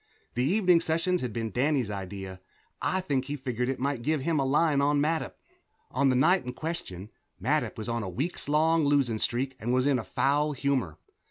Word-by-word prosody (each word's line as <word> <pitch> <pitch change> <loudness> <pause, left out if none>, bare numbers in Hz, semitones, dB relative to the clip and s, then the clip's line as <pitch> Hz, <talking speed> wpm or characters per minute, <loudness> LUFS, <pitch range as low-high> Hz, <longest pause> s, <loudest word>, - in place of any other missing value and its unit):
The 125 - 0
evening 180 +2 +4
sessions 170 +3 0
had 125 - -3
been 110 0 -3
Danny's 130 -2 +1
idea 95 -1 -6 0.4
I 185 - 0
think 140 -7 -1
he 145 +2 -3
figured 125 -3 -2
it 135 - -1
might 135 -1 -1
give 155 +3 0
him 155 +2 0
a 135 - +1
line 145 +1 +3
on 145 +1 +2
Mattup. 160 +2 0 0.6
On 135 +2 +2
the 130 - +2
night 180 +9 +4
in 125 0 -5
question, 120 - -6 0.3
Mattup - - 0
was 110 - -5
on 115 0 -1
a 100 - -4
week's 145 - -3
losing 145 -6 +3
streak 130 +4 -1
and 120 +2 -2
was 130 0 +2
in 140 -3 +3
a - - -4
foul 145 +9 +1
humor. 130 - -1
135 Hz, 195 wpm, -28 LUFS, 120-155 Hz, 0.6 s, evening